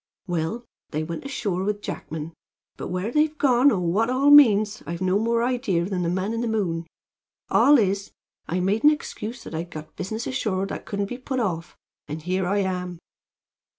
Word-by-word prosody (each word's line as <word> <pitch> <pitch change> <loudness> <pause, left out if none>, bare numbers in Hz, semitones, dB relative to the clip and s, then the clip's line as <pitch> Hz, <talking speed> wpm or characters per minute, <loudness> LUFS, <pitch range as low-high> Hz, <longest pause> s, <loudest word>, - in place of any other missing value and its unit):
Well, 175 +6 -2 0.2
they 155 +1 -2
went 165 - -6
ashore 205 -9 -2
with 205 +1 -2
Jackman, 160 +1 -5 0.4
but - - -6
where 185 +5 -2
they've 305 +2 +2
gone 260 -1 +5
or 215 - +1
what 185 +7 +1
it - - +1
all 275 +3 +4
means 215 -7 +6
I've 170 +1 -4
no 185 +2 +2
more 230 +1 +1
idea 240 -9 0
than 185 -1 -2
the 170 - 0
man 190 +5 -1
in 230 - -2
the 240 - -1
moon. 175 -7 -1 0.6
All 290 0 +6
is, 200 -3 0 0.4
I 180 +3 -1
made 200 +5 +1
an 300 - +9
excuse 245 -5 -4
that - - -9
I'd 165 +2 -4
got 155 -2 -9
business 220 +5 -4
ashore 195 -7 -1
that 195 - -6
couldn't 200 -1 -1
be 245 +5 -6
put 260 0 -3
off, 170 -8 -3 0.3
and 155 +1 -6
here 185 +1 0
I 200 +2 +1
am." 180 -2 -3
200 Hz, 195 wpm, -24 LUFS, 180-235 Hz, 0.6 s, an